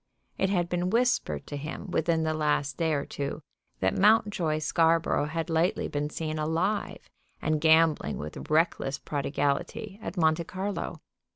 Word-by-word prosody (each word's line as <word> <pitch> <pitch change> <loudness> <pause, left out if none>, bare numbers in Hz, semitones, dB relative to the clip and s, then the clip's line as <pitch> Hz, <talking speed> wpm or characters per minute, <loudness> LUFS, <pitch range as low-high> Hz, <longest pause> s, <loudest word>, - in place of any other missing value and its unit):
It 190 - +2
had 175 -3 +1
been 175 +1 -1
whispered 230 - +1
to - - -6
him 150 +3 -6
within 160 0 +1
the 160 0 0
last 150 -3 0
day 160 +1 0
or 145 -1 -1
two 145 +2 -5 0.4
that 95 0 +2
Mountjoy 200 -6 +3
Scarborough 165 -1 +2
had 165 +2 -3
lately 165 +2 +1
been 145 0 -2
seen 155 0 -3
alive, 160 +7 -1 0.3
and 155 -1 0
gambling 160 - +4
with 75 +1 -7
reckless 155 -3 +1
prodigality, 150 +10 -2
at 190 - -6
Monte 160 0 +2
Carlo. 195 +3 -4
160 Hz, 150 wpm, -28 LUFS, 150-175 Hz, 0.4 s, gambling